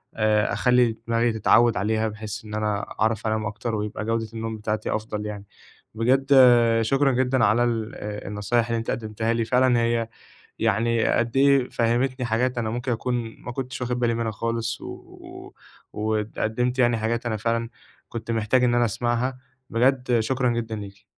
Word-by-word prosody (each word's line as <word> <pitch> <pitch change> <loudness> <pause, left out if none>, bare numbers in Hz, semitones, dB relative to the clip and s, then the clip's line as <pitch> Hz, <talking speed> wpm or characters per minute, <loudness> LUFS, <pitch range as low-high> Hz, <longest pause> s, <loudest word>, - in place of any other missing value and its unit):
آآ 110 -1 +2
أخلّي 125 -3 +3
دماغي 115 0 +1
تتعوّد 115 +2 +4
عليها، 110 +3 0
بحيث 105 0 -6
إن 105 - -9
أنا 105 -1 -1 0.2
أعرف 110 0 +1
أنام 110 0 -1
أكتر، 110 +2 -3
ويبقى 105 0 -4
جودة 115 0 -1
النوم 110 0 -4
بتاعتي 105 0 -2
أفضل 105 -1 -4
يعني. 105 -1 -6 0.5
بجد 130 +4 +2 0.5
شكرًا 135 +5 +2
جدًا 125 -2 +2
على 110 +4 +3
ال 115 -2 -2
آآ 105 0 -6
النصايح 105 +3 0
اللي 115 0 -1
أنتِ 115 - -3
قدّمتِها 110 0 -2
لي، 115 -1 0
فعلًا 125 0 +3
هي 115 -1 0 0.5
يعني 115 +1 +1
قد 120 +2 0
إيه 140 -2 +4
فهّمتني 125 +2 0
حاجات 120 +2 0
أنا 110 -2 -1
ممكن 120 +2 -3
أكون 120 -1 -3
ما 120 - -6
كنتش 130 +1 -5
واخد 125 0 -2
بالي 120 -1 +1
منها 115 -1 -2
خالص، 115 +1 -3
و - - -8
و - - -13 0.4
وقدّمتِ 110 +3 -1
يعني 120 -2 +3
حاجات 115 +2 -2
أنا 110 -2 -1
فعلًا 115 +1 -1 0.4
كنت 115 0 -5
محتاج 115 +3 +2
إن 120 -1 +3
أنا 120 0 +3
أسمّعها، 120 +3 -1 0.3
بجد 125 0 +2
شكرًا 125 +2 0
جدًا 115 -1 -2
ليكِ. 100 -1 -9
115 Hz, 170 wpm, -24 LUFS, 110-120 Hz, 0.5 s, تتعوّد